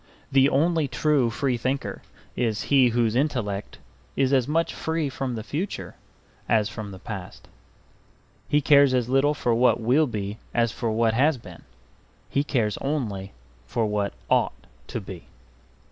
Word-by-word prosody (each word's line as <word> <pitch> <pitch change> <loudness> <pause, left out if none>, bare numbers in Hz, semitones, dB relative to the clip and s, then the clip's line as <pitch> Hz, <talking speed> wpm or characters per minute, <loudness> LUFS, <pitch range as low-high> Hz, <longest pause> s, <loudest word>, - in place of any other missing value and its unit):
The 135 +1 +5
only 160 +2 +2
true 145 -4 +2
free 125 +2 -1
thinker 130 +4 -3 0.3
is 110 -3 0
he 130 -2 +6
whose 115 -1 +1
intellect 120 -8 -1 0.4
is 135 0 +2
as 130 -2 +3
much 165 +3 0
free 160 -2 -2
from 130 -2 -3
the 110 - -5
future 165 - -4 0.6
as 110 -2 +3
from 110 -3 -7
the 95 - -9
past. 95 -2 -8 1.0
He 150 - +3
cares 140 -2 +5
as 125 -1 0
little 135 +3 +3
for 120 -5 0
what 120 +2 +3
will 130 +7 +3
be 105 -2 -4 0.2
as 115 -1 +2
for 115 +1 -3
what 110 0 +2
has 140 +5 +3
been; 90 -7 -12 0.7
he 140 - +2
cares 115 -8 0
only 110 -10 -3 0.3
for 115 - 0
what 105 -1 -1
ought - - +2 0.3
to - - -4
be. 95 -4 -10
125 Hz, 155 wpm, -25 LUFS, 110-140 Hz, 1.0 s, he